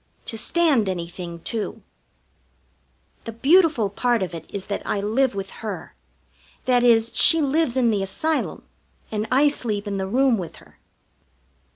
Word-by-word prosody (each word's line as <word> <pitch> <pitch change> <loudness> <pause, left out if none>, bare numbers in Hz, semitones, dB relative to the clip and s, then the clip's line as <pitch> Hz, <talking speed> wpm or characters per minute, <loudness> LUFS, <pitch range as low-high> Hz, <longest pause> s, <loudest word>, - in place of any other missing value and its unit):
To 225 - +1
stand 265 - +2
anything, 170 -1 -6
too. 220 +3 -5 1.4
The 230 - -5
beautiful 285 - +3
part 240 0 +1
of 180 - -5
it 165 -1 -9
is 195 -1 -5
that 200 - -3
I 205 - -2
live 225 +4 +1
with 195 -1 -5
her; 215 -3 -6 0.7
that 245 -1 +3
is, 230 -1 +4
she 325 - +6
lives 285 -3 +1
in 240 -3 +3
the 205 -2 0
Asylum, 310 +12 -2 0.5
and 215 0 -2
I 275 +3 +4
sleep 220 -7 -1
in 200 -1 -3
the 190 0 -2
room 250 +1 +2
with 165 -3 -7
her. 75 -3 -19
225 Hz, 155 wpm, -23 LUFS, 195-260 Hz, 1.4 s, she